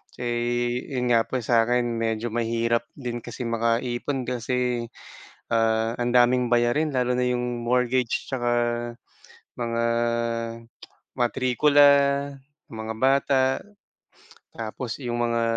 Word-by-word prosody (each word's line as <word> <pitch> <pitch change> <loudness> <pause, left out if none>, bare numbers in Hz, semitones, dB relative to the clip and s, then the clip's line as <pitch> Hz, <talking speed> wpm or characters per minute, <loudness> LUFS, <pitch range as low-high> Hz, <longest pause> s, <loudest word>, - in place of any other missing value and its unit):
Eh, 120 0 -1
yun 125 -1 0
nga 115 -1 +3
po - - -5
sa'kin 120 +2 +2 0.2
medyo 115 0 -2
mahirap 115 0 0
din 120 -3 -5
kasi 120 +2 -7
makaipon 120 +3 -1
kasi, 125 0 -1 0.6
ah, 115 0 +1
ang 120 0 -1
daming 125 0 +3
bayarin 120 +6 +2
lalo 125 -1 +1
na 125 - +1
yung 125 -1 -2
mortgage 125 0 0
tsaka 120 -3 -1 1.0
mga 115 -1 -2 1.4
matrikula, 130 +4 +4 0.8
mga 110 0 -5
bata, 135 0 +3 1.1
tapos 115 +2 -6
yung 120 -3 -2
mga, 115 0 0
120 Hz, 105 wpm, -25 LUFS, 115-125 Hz, 1.4 s, matrikula